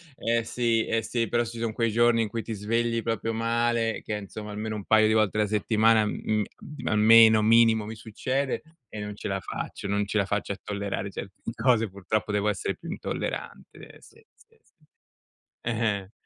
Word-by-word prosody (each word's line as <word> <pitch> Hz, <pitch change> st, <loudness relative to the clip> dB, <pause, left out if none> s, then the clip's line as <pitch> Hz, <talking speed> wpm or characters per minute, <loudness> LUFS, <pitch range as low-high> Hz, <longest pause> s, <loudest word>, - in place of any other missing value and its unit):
Eh 115 Hz, 0 st, 0 dB
sì, 115 Hz, -1 st, +1 dB
eh 115 Hz, -, 0 dB
sì, 115 Hz, -1 st, -1 dB
però 120 Hz, 0 st, +1 dB
ci 115 Hz, 0 st, -7 dB
son 115 Hz, -1 st, -2 dB
quei 115 Hz, 0 st, 0 dB
giorni 120 Hz, +1 st, +4 dB
in 110 Hz, -, -1 dB
cui 115 Hz, +2 st, -3 dB
ti 115 Hz, -, -5 dB
svegli 115 Hz, +2 st, -1 dB
proprio 115 Hz, 0 st, -2 dB
male 115 Hz, 0 st, 0 dB
che 105 Hz, -, -2 dB
insomma 105 Hz, +1 st, -7 dB
almeno 110 Hz, +1 st, -4 dB
un 100 Hz, -, -8 dB
paio 110 Hz, 0 st, +5 dB
di 110 Hz, -, +2 dB
volte 110 Hz, -2 st, +2 dB
alla 105 Hz, -, +2 dB
settimana 110 Hz, +1 st, +3 dB
mhmm 105 Hz, 0 st, -1 dB
d 150 Hz, 0 st, -9 dB
almeno, 110 Hz, +1 st, +7 dB
minimo 115 Hz, 0 st, +5 dB
mi 110 Hz, +1 st, -6 dB
succede, 130 Hz, +5 st, -2 dB, 0.3 s
e 105 Hz, -, -8 dB
non 105 Hz, 0 st, -6 dB
ce -, -, -5 dB
la 95 Hz, -1 st, -2 dB
faccio, 100 Hz, -, -6 dB
non 100 Hz, 0 st, +1 dB
ce 105 Hz, -, -2 dB
la 100 Hz, -, +2 dB
faccio 100 Hz, 0 st, -2 dB
a -, -, -11 dB
tollerare 100 Hz, -1 st, -4 dB
certe 95 Hz, 0 st, -9 dB
cose, 115 Hz, -2 st, +2 dB
purtroppo 100 Hz, +3 st, -2 dB
devo 105 Hz, 0 st, 0 dB
essere 100 Hz, -4 st, -1 dB
più -, -, -9 dB
intollerante, -, -, -6 dB
sì, -, -, -20 dB
sì, -, -, -26 dB
sì. -, -, -34 dB, 0.9 s
Eh-eh. 110 Hz, -4 st, -1 dB
110 Hz, 190 wpm, -26 LUFS, 105-115 Hz, 0.9 s, almeno